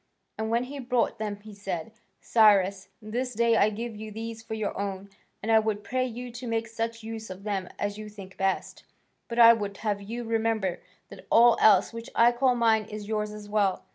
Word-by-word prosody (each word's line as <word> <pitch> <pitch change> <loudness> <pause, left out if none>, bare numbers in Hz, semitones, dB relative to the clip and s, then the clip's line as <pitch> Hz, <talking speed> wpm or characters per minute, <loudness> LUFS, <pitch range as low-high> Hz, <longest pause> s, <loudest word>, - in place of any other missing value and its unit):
And 220 0 -1
when 235 +2 +1
he 280 +3 -7
brought 245 -2 0
them 210 -2 -3
he 215 0 -11
said, 195 -2 -5 0.3
"Cyrus, 200 -3 +3
this 245 +3 -3
day 230 +1 +3
I 215 -1 +4
give 225 +2 -5
you 215 +1 -7
these 225 +1 -6
for 225 0 -6
your 215 -2 -3
own, 200 0 -4 0.3
and 225 - 0
I 220 - +7
would 215 -1 -2
pray 255 +2 -1
you 245 +1 -7
to 245 +1 -7
make 230 0 -1
such 230 0 -4
use 220 -1 -7
of 185 +1 -9
them 195 -3 -3
as 205 +1 -3
you 215 0 -7
think 195 -3 -11
best, 195 0 -2 0.4
but 235 - -6
I 230 -1 +9
would 205 -3 -4
have 205 -1 0
you 230 +4 -5
remember 225 -4 0 0.3
that - - -13
all 235 0 +6
else 220 - +5
which 230 0 -7
I 235 +1 +6
call 250 +1 +2
mine 225 -2 +3
is 210 -1 -8
yours 210 -1 -1
as 210 -1 -9
well. 205 -2 0
220 Hz, 210 wpm, -27 LUFS, 205-230 Hz, 0.4 s, I